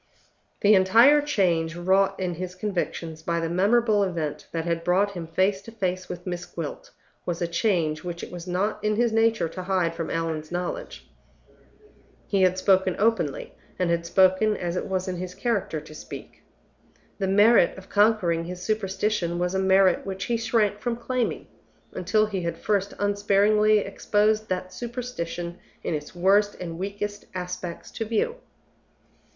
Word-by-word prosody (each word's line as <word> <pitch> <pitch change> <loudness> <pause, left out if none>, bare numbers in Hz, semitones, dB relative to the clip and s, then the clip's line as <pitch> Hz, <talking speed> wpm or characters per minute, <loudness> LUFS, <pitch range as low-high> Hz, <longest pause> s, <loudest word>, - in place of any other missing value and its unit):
The 210 +1 +6
entire 230 +10 +6
change 175 - +1
wrought 190 +3 +2
in 180 -2 -1
his 180 +2 -6
convictions 175 -5 -3
by 170 +1 -1
the 165 0 -2
memorable 210 +4 +3
event 170 -6 -2
that 165 -1 -3
had 170 -1 -1
brought 190 +4 +2
him 175 -4 -6
face 190 +4 +1
to 230 - -11
face 185 -4 -3
with 180 0 -7
Miss 175 -1 -4
Gwilt 165 -3 -7 0.3
was 175 -1 -3
a 170 - 0
change 170 -4 0
which 175 -1 -5
it - - -7
was 175 0 -8
not 200 +4 -1
in 215 0 +1
his 235 +1 +2
nature 225 -5 +2
to 185 - -6
hide 180 -3 0
from 165 -1 -4
Allan's 160 -1 -3
knowledge. 180 - -5 1.2
He 200 -2 +1
had 185 0 +3
spoken 190 -1 +3
openly, 205 -9 0 0.2
and 180 -2 +1
had 170 0 0
spoken 190 +4 +4
as 175 0 -3
it - - -2
was 185 0 -2
in 185 -1 -3
his 180 0 -6
character 200 -7 -1
to 155 +1 -13
speak. - - -10 0.8
The 195 - 0
merit 205 -1 +5
of 190 - -11
conquering 205 -6 +2
his 180 +1 -6
superstition 195 -3 -1
was 180 +1 -1
a 190 - +1
merit 190 0 +4
which 190 0 -4
he 235 - 0
shrank 220 -3 +1
from 240 +1 -2
claiming, 240 0 -2 0.5
until 215 +4 +2
he 200 -3 -3
had 170 -1 -3
first 200 -1 -1
unsparingly 205 +1 +3
exposed 210 +2 +1
that 185 0 -3
superstition 230 -8 -5 0.2
in - - -2
its 150 +3 -5
worst 200 +3 +3
and 170 -2 -6
weakest 205 +1 -4
aspects 180 -1 -5
to 225 - -4
view. 230 - -1
190 Hz, 165 wpm, -25 LUFS, 175-210 Hz, 1.2 s, The